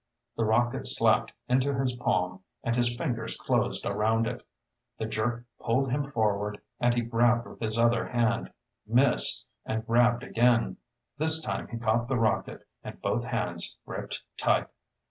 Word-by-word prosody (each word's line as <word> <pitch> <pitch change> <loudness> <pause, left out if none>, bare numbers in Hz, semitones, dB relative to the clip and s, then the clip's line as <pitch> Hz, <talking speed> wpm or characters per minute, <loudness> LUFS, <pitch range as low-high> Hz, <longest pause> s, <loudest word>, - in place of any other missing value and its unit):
The 115 - 0
rocket 120 +2 +1
slapped - - +2 0.2
into 130 +2 +1
his 135 -1 0
palm 90 -6 -1 0.2
and 115 - 0
his 120 0 +3
fingers 120 -5 -3
closed - - -1
around 110 +3 +1
it. 125 +1 -4 0.6
The 110 - -3
jerk 115 +2 -2 0.2
pulled 130 +3 0
him 140 +1 -1
forward 105 -4 -1 0.2
and 120 0 +2
he 120 - +1
grabbed 120 +1 +2
with - - -13
his 110 0 -2
other 115 0 +2
hand, 115 -2 0 0.4
missed, 125 +3 +5 0.2
and 110 0 -3
grabbed 120 +1 +3
again. 120 -1 +2 0.4
This 160 +1 +7
time - - -3
he 115 - -6
caught 115 +1 0
the 130 -1 0
rocket, 115 -1 -1 0.2
and - - -9
both - - -1
hands - - -1
gripped - - -6
tight. - - +2
120 Hz, 155 wpm, -28 LUFS, 110-125 Hz, 0.6 s, This